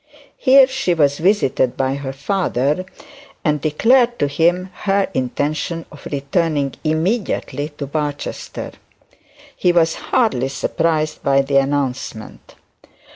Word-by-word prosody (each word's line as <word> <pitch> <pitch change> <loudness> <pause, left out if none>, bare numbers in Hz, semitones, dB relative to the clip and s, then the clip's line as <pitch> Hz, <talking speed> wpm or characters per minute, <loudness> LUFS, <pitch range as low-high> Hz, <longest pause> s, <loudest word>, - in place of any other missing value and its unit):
Here 270 0 +7
she 260 -9 -1
was 145 -3 +2
visited 165 - +1
by 135 0 0
her 140 -1 -4
father 150 +1 -1 0.6
and 150 -2 +1
declared 240 - +3
to - - +1
him 175 +6 +1
her 195 -1 0
intention 145 +6 -2
of 145 - -10
returning 140 0 0
immediately 160 -2 -1
to 140 - -4
Barchester. 145 0 -4 0.8
He 180 - +2
was 165 -2 +3 0.2
hardly 220 - +2
surprised 155 +2 -1
by 140 0 +3
the 140 0 +1
announcement. 135 -5 -2
155 Hz, 115 wpm, -19 LUFS, 140-185 Hz, 0.8 s, Here